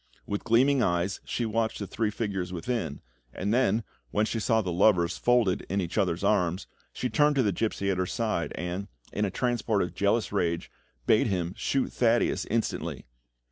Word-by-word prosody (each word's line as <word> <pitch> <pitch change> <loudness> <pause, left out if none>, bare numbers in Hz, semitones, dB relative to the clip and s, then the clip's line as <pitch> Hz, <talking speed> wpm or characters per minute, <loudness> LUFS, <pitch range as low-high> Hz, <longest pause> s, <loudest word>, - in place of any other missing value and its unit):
With 100 - -3
gleaming 130 +4 +4
eyes 90 -1 0
she 120 - -2
watched 110 0 0
the 100 - -4
three 110 +2 -1
figures 100 -5 -3
within, 90 - -3 0.3
and 100 +4 -1
then, 115 -3 +2 0.3
when 105 - +1
she 115 - -2
saw 110 +1 +2
the 90 - -2
lovers 90 -1 +3
folded 120 -6 +2
in 100 - 0
each 90 -3 -3
other's 95 -3 0
arms, 95 -3 +1 0.3
she 125 - -2
turned 145 +5 +3
to 135 - +3
the 105 - +2
gipsy 100 0 -1
at 95 - -1
her 90 - 0
side, 110 -6 -1
and, 90 +3 -4 0.3
in 105 - +1
a - - -1
transport 120 -1 0
of 90 - -5
jealous 100 +3 +1
rage, 85 -4 -1 0.3
bade - - +4
him 90 -2 -1
shoot 135 -1 -1
Thaddeus 115 -6 +2
instantly. 115 +1 -2
100 Hz, 180 wpm, -28 LUFS, 90-115 Hz, 0.3 s, gleaming